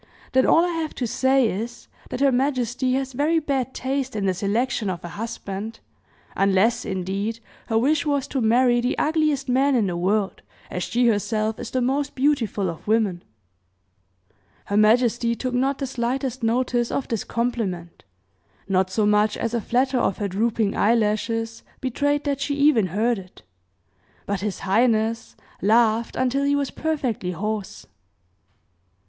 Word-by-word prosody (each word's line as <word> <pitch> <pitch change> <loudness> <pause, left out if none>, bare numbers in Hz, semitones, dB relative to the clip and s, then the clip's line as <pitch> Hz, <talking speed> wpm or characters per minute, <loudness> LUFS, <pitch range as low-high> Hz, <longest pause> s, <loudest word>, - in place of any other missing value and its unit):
Then 260 0 +3
all 335 - +5
I - - -1
have 325 -2 -3
to 250 - -2
say, 260 +2 +2
is, 225 +4 -5 0.2
that 250 - -4
her 280 -1 +5
majesty 255 -1 0
has 265 0 -2
very 300 +6 +1
bad 275 -5 -1
taste 265 -1 -2
in 205 -2 -1
the 190 - +2
selection 210 +3 -1
of 180 -2 -4
a - - -6
husband, 220 +1 -6 0.6
unless, 195 +4 +2
indeed, 195 +4 -3 0.3
her 225 - +1
wish 285 +6 +2
was 285 -3 0
to 265 - -1
marry 240 +2 +3
the 245 - -1
ugliest 305 -3 +1
man 265 +2 +3
in 230 -4 +2
the 180 -2 -2
world, 195 +3 0 0.3
as 180 - -3
she 245 +6 +1
herself 215 0 0
is - - -5
the 255 - -1
most 275 +3 -1
beautiful 255 -8 +1
of 165 +2 -7
women!" 210 -5 +1 1.4
Her 200 - -2
majesty 235 +2 +3
took 255 +1 -3
not 265 +2 +1
the 275 - -3
slightest 255 +1 -2
notice 240 +1 +1
of 275 - -2
this 225 -3 -2
compliment, 215 -8 -3 0.6
not 190 -1 +1
so 205 +3 +1
much 210 +1 +3
as 230 0 -2
a 235 - 0
flatter 255 +3 +1
of 195 - 0
her 205 - -2
drooping 215 +1 0
eye 225 +3 +3
lashes 225 +1 -1 0.2
betrayed 285 +3 0
that 280 -1 -2
she 285 0 -1
even 280 -8 +4
heard 215 +5 0
it, 185 -1 -14 0.8
but 200 -2 -2
his 205 -2 -3
highness 225 +2 +1 0.3
laughed 225 +2 +3
until 260 +2 +1
he 285 0 +2
was 280 -1 -1
perfectly 255 - -2
hoarse. 210 +2 -4
235 Hz, 160 wpm, -23 LUFS, 210-265 Hz, 1.4 s, all